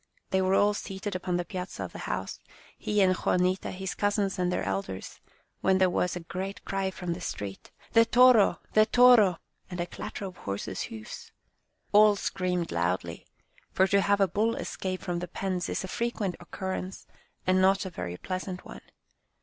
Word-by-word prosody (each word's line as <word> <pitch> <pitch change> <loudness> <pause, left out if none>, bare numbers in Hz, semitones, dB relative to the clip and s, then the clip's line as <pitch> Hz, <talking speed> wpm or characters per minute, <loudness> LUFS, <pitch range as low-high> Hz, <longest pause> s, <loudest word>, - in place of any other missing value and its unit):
They 190 - +3
were 190 +1 +2
all 205 +1 +4
seated 195 0 -5
upon 180 -1 -1
the 175 - -2
piazza 180 0 -5
of - - -6
the - - -9
house, - - -4 0.4
he 210 -1 0
and 185 -1 +4
Juanita, 180 +1 +1
his 190 0 -4
cousins 205 -2 0
and 180 0 +1
their - - -1
elders, 95 -1 -4 0.4
when 190 0 +3
there 185 -1 +3
was 180 0 0
a 180 - -5
great 190 +4 -6
cry 195 -1 -1
from 180 -2 -4
the 175 - -8
street, 100 - -6
" - - -26
The 230 - +7
toro! 240 -2 +5
The 215 0 +5
toro! 240 -8 +6 0.2
" - - -41
and 180 -1 -6
a 175 - 0
clatter 200 - -6
of 185 -2 -8
horses' 100 0 -4
hoofs. 110 -1 -9 0.6
All 210 0 +7
screamed 180 -3 -2
loudly, 85 0 -2 0.5
for 190 - +4
to 200 +1 +3
have 200 +1 +2
a 195 - +4
bull 220 +4 +1
escape 185 -1 -4
from 175 -2 -2
the 180 - -5
pens 180 0 -3
is - - -2
a - - -4
frequent 210 -4 -2
occurrence, 190 +1 -5 0.4
and 185 0 +3
not 195 +1 +3
a 190 - -5
very 90 - -5
pleasant 185 - -5
one. - - -10
185 Hz, 190 wpm, -28 LUFS, 180-200 Hz, 0.6 s, The